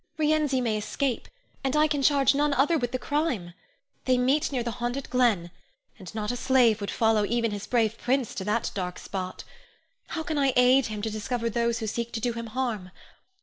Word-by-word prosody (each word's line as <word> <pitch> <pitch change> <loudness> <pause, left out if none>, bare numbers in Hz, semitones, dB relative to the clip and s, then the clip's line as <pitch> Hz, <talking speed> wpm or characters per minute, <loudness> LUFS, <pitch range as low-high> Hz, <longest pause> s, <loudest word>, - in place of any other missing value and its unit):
Rienzi 300 -4 +2
may 225 -3 0
escape, 255 +3 -2 0.4
and 270 +1 0
I 305 +1 +5
can 290 -2 -1
charge 275 0 +4
none 290 0 +1
other 290 +6 +3
with 245 -6 -1
the 255 - -1
crime. 255 - -2 0.5
They 255 -1 +3
meet 265 +5 +2
near 255 -3 -1
the 235 - -2
haunted 245 +3 -3
glen, 225 -9 +2 0.5
and 190 +2 -10
not 210 0 -2
a - - -3
slave 245 -4 +3
would 200 - -3
follow 220 -2 +2
even 230 +1 0
his 205 -1 -5
brave 225 -2 +1
prince 255 -1 0
to 190 - -4
that 210 +2 0
dark 180 -2 -4
spot. 185 -2 -5 0.6
How 320 - -4
can 315 -3 -2
I 275 -2 +3
aid 250 +1 +5
him 210 -2 -5
to 220 - -1
discover 230 +2 -2
those 235 +1 0
who 225 - -4
seek 235 +2 -3
to 225 - -2
do 240 +1 -1
him 230 0 -5
harm? 220 -6 -3
240 Hz, 205 wpm, -27 LUFS, 215-270 Hz, 0.6 s, I